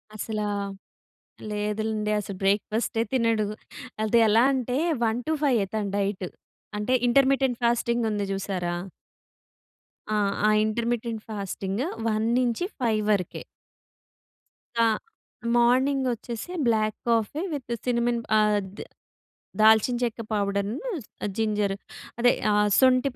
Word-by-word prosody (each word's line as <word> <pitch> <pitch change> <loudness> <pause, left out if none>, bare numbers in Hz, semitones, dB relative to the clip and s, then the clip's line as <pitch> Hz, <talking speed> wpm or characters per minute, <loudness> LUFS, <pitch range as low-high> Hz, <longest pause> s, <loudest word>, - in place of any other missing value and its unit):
అసలా 215 -1 -3 1.0
లేదులెండి. 210 +1 -1
అసలు 200 -2 -6
బ్రేక్‌ఫస్టే 215 +3 +1
తినడు. 230 -4 +2 0.6
అది 225 +2 +3
ఎలా 225 +3 +5
అంటే 255 0 -1 0.3
1 225 +2 0
టు 315 - +1
ఫైయ్యే 240 -8 +3
తన 215 -2 0
డైట్. 195 -2 -1 0.5
అంటే 250 +5 0 0.2
ఇంటర్‌మిటెంట్ 265 -1 +3
ఫాస్టింగ్ 235 0 +1
ఉంది 205 -1 -1
చూశారా? 185 -3 -2 1.4
ఆ! - - +1 0.3
ఆ! - - +5 0.2
Intermittent 230 0 -2
fasting. 200 +2 -3 0.2
1-5 235 - 0
వరకే. 180 -4 -1 1.4
ఆ! - - +5 0.7
మార్నింగ్ 260 +3 +3
వచ్చేసి 235 +6 -6 0.2
బ్లాక్ 215 -2 +2
కాఫీ 230 +6 +1
విత్ 255 -5 -4
సినమన్ 235 -1 +1 0.2
ఆహ్, 210 -1 +3 0.2
ద్ - - -6 0.8
దాల్చిన 220 +3 +5
చెక్క 230 -1 -2
పౌడర్, 200 0 0 0.7
జింజర్ 210 -3 0 0.4
అదే 245 +1 +5 0.2
ఆహ్, 210 0 +3
సొంటి 255 +1 +4
220 Hz, 105 wpm, -26 LUFS, 210-240 Hz, 1.4 s, ఎలా